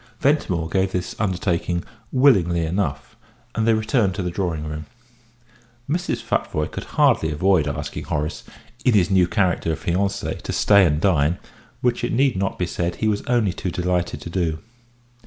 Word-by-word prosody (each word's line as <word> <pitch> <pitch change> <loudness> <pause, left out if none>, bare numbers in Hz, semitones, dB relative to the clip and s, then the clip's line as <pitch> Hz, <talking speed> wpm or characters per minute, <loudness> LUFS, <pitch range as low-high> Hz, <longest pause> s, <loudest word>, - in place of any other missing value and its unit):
Ventimore 95 - +1
gave 95 +3 0
this 90 -1 -3
undertaking 90 -3 -1 0.3
willingly 95 - +4
enough, 80 -4 -2 0.4
and 115 0 0
they 115 - +5
returned 110 -3 +1
to 100 - -2
the 90 - -2
drawing 85 -4 -2
room. 75 0 -6 1.0
Mrs. 150 -6 -2
Futvoye 75 -8 -1
could - - -6
hardly 80 - +4
avoid 85 0 +2
asking 70 - -4
Horace, 75 +1 -3 0.4
in 125 -4 +4
his 95 -2 +3
new 95 -2 +4
character 90 -3 +1
of - - -5
fiancé, 100 +3 -1
to - - -5
stay 100 -3 +5
and 75 -1 +1
dine, 85 -2 +2 0.4
which 125 -1 0
it - - -1
need 135 0 +3
not 95 +1 -1
be 90 - 0
said 85 0 -2
he 110 - -1
was 105 -1 +1
only 115 -7 +2
too 95 - -3
delighted 90 0 -1
to 85 - -7
do. 85 -4 0
90 Hz, 170 wpm, -22 LUFS, 85-105 Hz, 1.0 s, they